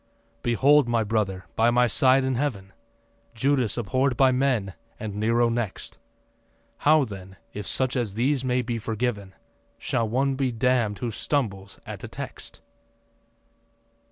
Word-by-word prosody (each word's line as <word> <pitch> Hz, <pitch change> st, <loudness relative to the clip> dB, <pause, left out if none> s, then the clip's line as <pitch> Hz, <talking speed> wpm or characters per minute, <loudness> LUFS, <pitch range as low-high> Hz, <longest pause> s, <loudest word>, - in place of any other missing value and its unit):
Behold, 135 Hz, +4 st, +4 dB
my 115 Hz, -1 st, +1 dB
brother, 100 Hz, -4 st, -1 dB
by 115 Hz, +1 st, +4 dB
my 125 Hz, +1 st, +4 dB
side 130 Hz, +1 st, +4 dB
in 130 Hz, -, 0 dB
Heaven 115 Hz, -8 st, -3 dB, 0.6 s
Judas 130 Hz, -2 st, +1 dB
abhor'd 130 Hz, +3 st, 0 dB
by 130 Hz, 0 st, +5 dB
men 125 Hz, -7 st, 0 dB, 0.3 s
and 110 Hz, -2 st, -5 dB
Nero 115 Hz, +3 st, +2 dB
next. 115 Hz, -4 st, -4 dB, 0.8 s
How 155 Hz, -1 st, +4 dB
then, 95 Hz, -3 st, -10 dB, 0.2 s
if 105 Hz, -1 st, -6 dB
such 130 Hz, 0 st, 0 dB
as 115 Hz, -6 st, -2 dB
these 130 Hz, +3 st, +1 dB
may 125 Hz, -1 st, 0 dB
be 115 Hz, -1 st, -3 dB
forgiven, 110 Hz, -3 st, -3 dB, 0.4 s
Shall 115 Hz, -2 st, -1 dB
one 135 Hz, +4 st, +1 dB
be 130 Hz, -1 st, -1 dB
damn'd 120 Hz, -3 st, +1 dB
who 120 Hz, -2 st, -3 dB
stumbles 100 Hz, -7 st, -3 dB
at -, -, -8 dB
a -, -, -5 dB
text? -, -, -8 dB
120 Hz, 140 wpm, -25 LUFS, 105-130 Hz, 0.8 s, by